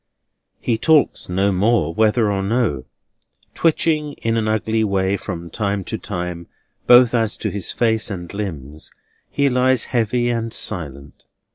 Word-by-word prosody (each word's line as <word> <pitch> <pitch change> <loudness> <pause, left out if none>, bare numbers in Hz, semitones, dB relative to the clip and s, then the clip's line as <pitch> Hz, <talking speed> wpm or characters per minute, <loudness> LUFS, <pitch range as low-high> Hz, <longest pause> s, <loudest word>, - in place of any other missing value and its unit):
He 115 -2 -1
talks 155 - +2
no 95 +3 +1
more, 95 -3 +1
whether 110 +1 +2
or 100 -1 -1
no. 95 - -1 0.7
Twitching 155 -2 +1
in 115 0 -2
an 110 -1 0
ugly 110 +1 0
way 100 -1 0
from 85 -4 -6
time 100 -1 -2
to - - -5
time, 85 -1 -5 0.4
both 125 -1 +7
as 115 -3 0
to - - -3
his 100 -2 -3
face 110 -2 0
and 90 -3 -7
limbs, 80 -8 -6 0.4
he 140 - +1
lies 130 -1 +2
heavy 120 +1 +1
and 115 -1 -2
silent. 70 -9 -2
110 Hz, 145 wpm, -20 LUFS, 90-120 Hz, 0.7 s, both